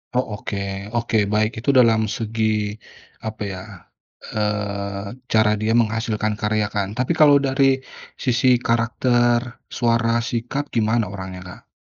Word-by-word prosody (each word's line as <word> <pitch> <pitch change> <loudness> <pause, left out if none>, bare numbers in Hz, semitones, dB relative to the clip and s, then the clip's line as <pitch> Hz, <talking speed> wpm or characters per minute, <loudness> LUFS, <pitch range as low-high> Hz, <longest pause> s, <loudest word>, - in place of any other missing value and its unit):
Oh, 125 - +3 0.2
oke, 100 - -5 0.4
oke 115 -1 0 0.2
baik, 110 +1 +2
itu 125 - -3
dalam 115 -2 +5
segi, 110 +1 -3 0.8
apa 110 -1 -7
ya, 95 - -6 0.7
eee, 100 +1 -3
cara 110 -2 +3
dia 110 +1 0
menghasilkan 110 -2 0
karya 105 -1 +1
kan, 100 -2 0
tapi 125 +6 -1
kalau 145 -2 +7
dari 135 0 +1 0.6
sisi 125 0 +2 0.2
karakter, 120 +1 +2 0.4
suara, 115 -1 +2
sikap, 120 +4 -2
gimana 110 0 +2
orangnya, 95 -1 -7
Kak? 90 - -12
115 Hz, 125 wpm, -21 LUFS, 105-120 Hz, 0.8 s, kalau